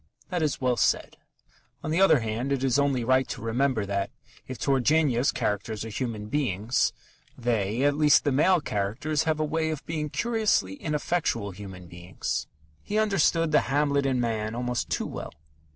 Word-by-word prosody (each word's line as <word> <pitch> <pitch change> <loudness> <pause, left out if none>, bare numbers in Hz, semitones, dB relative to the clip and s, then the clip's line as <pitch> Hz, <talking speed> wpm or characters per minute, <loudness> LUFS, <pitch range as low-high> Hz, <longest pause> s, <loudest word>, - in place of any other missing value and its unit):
That 180 -3 -1
is 150 -3 0
well 125 -2 +1
said. - - +1 0.7
On 155 - -3
the 170 +4 +2
other 160 -9 +6
hand, 115 +5 -2
it 135 -1 0
is 135 0 +2
only 140 -4 +1
right 130 +2 +3
to - - -5
remember 115 0 0
that, 100 0 -2 0.4
if 130 - -6
Turgenev's 135 0 +2
characters 105 +2 -2
are - - -6
human 110 -2 -4
beings, 110 -2 0 0.5
they 115 0 0
(at 145 0 +4
least 150 -1 +5
the 145 - +1
male 165 +6 +4
characters) 120 +10 -1
have 155 -1 0
a 155 - +1
way 160 +1 -1
of 155 -2 -4
being 155 -2 -3
curiously 215 - +1
ineffectual 150 - -1
human 95 -2 -10
beings. 85 +1 -4 0.3
He 210 - -3
understood 180 -6 +2
the 150 - +2
Hamlet 140 0 +2
in 130 -2 +1
man 110 -2 -1
almost 125 0 -2
too - - -1
well. - - -6
130 Hz, 170 wpm, -27 LUFS, 110-155 Hz, 0.7 s, other